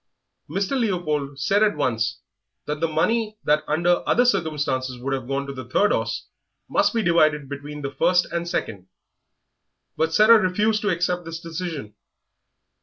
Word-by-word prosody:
Mr. 195 Hz, 0 st, -2 dB
Leopold 155 Hz, -, -1 dB
said 195 Hz, +10 st, +2 dB
at 210 Hz, -7 st, +3 dB
once 120 Hz, -3 st, -1 dB, 0.4 s
that 150 Hz, 0 st, -3 dB
the 165 Hz, -, +1 dB
money 215 Hz, +8 st, 0 dB
that 150 Hz, +1 st, +2 dB
under 175 Hz, +3 st, +2 dB
other 245 Hz, -, +4 dB
circumstances 150 Hz, -, 0 dB
would 135 Hz, +3 st, -3 dB
have 130 Hz, -3 st, -3 dB
gone 140 Hz, +1 st, -2 dB
to 140 Hz, -, -6 dB
the 130 Hz, -2 st, -9 dB
third 205 Hz, +10 st, +3 dB
horse -, -, -1 dB, 0.4 s
must -, -, +2 dB
be 230 Hz, -2 st, 0 dB
divided 155 Hz, -5 st, +3 dB
between 145 Hz, +1 st, -7 dB
the 140 Hz, -, -3 dB
first 180 Hz, +5 st, +2 dB
and 170 Hz, 0 st, -2 dB
second; 100 Hz, -, -4 dB, 1.1 s
but 160 Hz, 0 st, 0 dB
Sarah 215 Hz, +6 st, +7 dB
refused 210 Hz, +3 st, +1 dB
to 210 Hz, -, 0 dB
accept 175 Hz, 0 st, 0 dB
this 165 Hz, 0 st, -6 dB
decision. 165 Hz, -, -6 dB
160 Hz, 160 wpm, -23 LUFS, 140-185 Hz, 1.1 s, Sarah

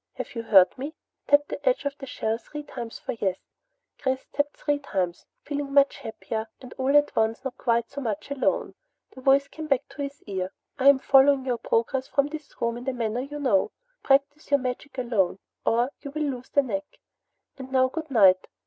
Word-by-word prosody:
Have -, -, -6 dB
you 230 Hz, -, -3 dB
heard 195 Hz, -5 st, +6 dB
me? 290 Hz, +4 st, -5 dB, 0.3 s
Tap 290 Hz, 0 st, +5 dB
the -, -, -6 dB
edge -, -, +1 dB
of 280 Hz, -1 st, -1 dB
the 270 Hz, -, -8 dB
shell 225 Hz, -2 st, -2 dB
three 295 Hz, +5 st, -8 dB
times 235 Hz, -5 st, -7 dB
for -, -, -5 dB
'Yes.'" 195 Hz, -5 st, -1 dB, 0.6 s
Chris 260 Hz, -1 st, -1 dB
tapped 290 Hz, 0 st, -1 dB
three 290 Hz, -1 st, 0 dB
times, 185 Hz, -10 st, -3 dB, 0.2 s
feeling 285 Hz, -1 st, -4 dB
much 280 Hz, 0 st, +5 dB
happier 220 Hz, 0 st, -5 dB
and 255 Hz, -, -11 dB
all 270 Hz, +2 st, +4 dB
at 290 Hz, 0 st, +2 dB
once 225 Hz, +3 st, +1 dB
not 265 Hz, -2 st, -4 dB
quite 235 Hz, -1 st, +1 dB
so 280 Hz, -, -5 dB
much 215 Hz, +1 st, -4 dB
alone. 280 Hz, -2 st, 0 dB, 0.4 s
The 260 Hz, -, -12 dB
voice 275 Hz, +1 st, +4 dB
came 315 Hz, -1 st, -8 dB
back 275 Hz, -4 st, +1 dB
to 290 Hz, -, -8 dB
his 280 Hz, +1 st, -6 dB
ear. 190 Hz, -2 st, -3 dB, 0.3 s
"I 270 Hz, +1 st, +7 dB
am 280 Hz, -, +7 dB
following 270 Hz, 0 st, +5 dB
your 245 Hz, -3 st, -1 dB
progress 260 Hz, +3 st, 0 dB
from 280 Hz, 0 st, +1 dB
this 300 Hz, -2 st, -8 dB
room 235 Hz, 0 st, 0 dB
in 245 Hz, -, -8 dB
the 265 Hz, -, -1 dB
manner 235 Hz, -1 st, -1 dB
you 290 Hz, +2 st, -6 dB
know. 235 Hz, -9 st, +2 dB, 0.3 s
Practise 280 Hz, +2 st, +2 dB
your 280 Hz, 0 st, +4 dB
magic 255 Hz, +2 st, -5 dB
alone, 225 Hz, -8 st, +1 dB, 0.3 s
or 240 Hz, +4 st, +2 dB
you 285 Hz, -, -6 dB
will 305 Hz, +2 st, -3 dB
lose 255 Hz, -3 st, -4 dB
the 280 Hz, -, +3 dB
knack. 290 Hz, +3 st, -5 dB, 0.6 s
And 265 Hz, 0 st, -8 dB
now 260 Hz, -1 st, +4 dB
good 315 Hz, +3 st, -6 dB
night. 195 Hz, -7 st, +5 dB
265 Hz, 205 wpm, -26 LUFS, 230-285 Hz, 0.6 s, I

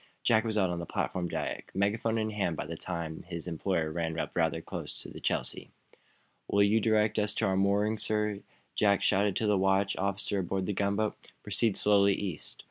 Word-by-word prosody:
Jack 110 Hz, -1 st, +4 dB
was 110 Hz, -2 st, -1 dB
out 95 Hz, -3 st, +2 dB
on 85 Hz, -, -3 dB
the 85 Hz, -, -4 dB
platform 90 Hz, -1 st, -2 dB
deck, -, -, -4 dB
megaphone 110 Hz, +3 st, +1 dB
in 110 Hz, -1 st, -1 dB
hand, 100 Hz, -5 st, -1 dB
by -, -, -3 dB
the 85 Hz, -, -5 dB
time 85 Hz, -2 st, -4 dB
that -, -, -12 dB
his 85 Hz, -3 st, -5 dB
employer 85 Hz, -1 st, -1 dB
ran 80 Hz, 0 st, -2 dB
up -, -, -3 dB
rather 80 Hz, -2 st, +1 dB
close -, -, -6 dB
to -, -, -8 dB
the -, -, -9 dB
"Chelsea." -, -, -2 dB, 0.8 s
"Will 100 Hz, 0 st, +4 dB
you 105 Hz, +2 st, +3 dB
direct 110 Hz, 0 st, +2 dB
us 105 Hz, 0 st, 0 dB
to -, -, +1 dB
our 95 Hz, -, +1 dB
moorings, 100 Hz, +3 st, +2 dB
sir?" 105 Hz, -1 st, 0 dB, 0.3 s
Jack 100 Hz, -2 st, +3 dB
shouted 100 Hz, 0 st, +2 dB
to 110 Hz, -, 0 dB
the 105 Hz, -2 st, +3 dB
watch 95 Hz, +1 st, +2 dB
officer 100 Hz, +1 st, -1 dB
aboard 95 Hz, +1 st, -1 dB
the 105 Hz, -, -1 dB
gunboat. 100 Hz, +2 st, 0 dB, 0.3 s
"Proceed 105 Hz, +1 st, +2 dB
slowly 100 Hz, -1 st, +4 dB
east. 95 Hz, -7 st, -5 dB
100 Hz, 205 wpm, -30 LUFS, 90-105 Hz, 0.8 s, Jack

